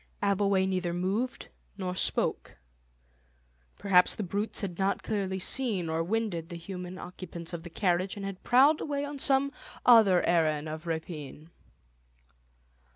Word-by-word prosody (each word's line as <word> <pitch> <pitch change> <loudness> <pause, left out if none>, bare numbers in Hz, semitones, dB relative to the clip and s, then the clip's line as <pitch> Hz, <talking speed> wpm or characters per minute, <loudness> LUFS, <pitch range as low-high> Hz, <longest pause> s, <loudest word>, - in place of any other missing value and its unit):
Abbleway 200 -1 +2
neither 185 -2 -1
moved 200 +8 -2 0.3
nor 185 -2 -3
spoke. - - 0 1.2
Perhaps 180 -2 +4
the 215 - -3
brutes 200 +4 -2
had 185 -4 -5
not 195 +1 0
clearly 195 -3 -2
seen 195 -4 0
or 160 +1 0
winded 185 -4 -2
the 170 - -7
human 180 +1 -7
occupants 175 -2 -7
of 170 - -4
the 175 - -9
carriage, 180 +1 0
and 200 - -5
had 195 -1 -6
prowled 275 +5 +4
away 285 -1 -2
on 285 -1 -7
some 275 0 +3 0.3
other 220 -7 +6
errand 155 -3 +1
of 155 +2 -7
rapine. 160 -1 -6
185 Hz, 140 wpm, -29 LUFS, 170-210 Hz, 1.2 s, other